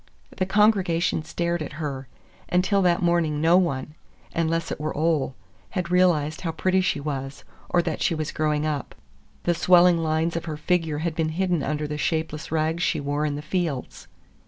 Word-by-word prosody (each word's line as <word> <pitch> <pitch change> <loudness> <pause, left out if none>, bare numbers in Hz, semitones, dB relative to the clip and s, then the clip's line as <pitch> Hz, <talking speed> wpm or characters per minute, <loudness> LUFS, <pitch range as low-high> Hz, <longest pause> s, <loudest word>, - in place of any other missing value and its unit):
The 185 - 0
congregation 190 -6 +2
stared 170 +1 -2
at 155 - -5
her. 140 -4 -5 0.4
Until 185 +3 +2
that 180 0 +2
morning 170 -3 +2
no 165 +3 +4
one—unless 165 +1 -2
it - - -4
were 155 -1 -3
Ole—had 165 +3 -2
realized 165 -4 +2
how 165 - -2
pretty 185 +4 +2
she 180 - 0
was, 140 -2 -5 0.3
or 175 - +2
that - - -3
she 165 - +2
was 155 -1 -3
growing 150 -1 0
up. 150 -3 -3 0.5
The 175 - +2
swelling 175 0 +5
lines 160 +1 0
of 170 - -3
her 155 -2 -4
figure 160 -1 0
had 170 - 0
been 155 0 0
hidden 175 0 0
under 150 +2 -2
the 150 0 -4
shapeless 160 -2 -2
rags 160 +1 0
she - - +1
wore 145 +1 -1
in 145 - -2
the 145 - -6
fields. 160 -5 -3
160 Hz, 175 wpm, -25 LUFS, 150-175 Hz, 0.5 s, swelling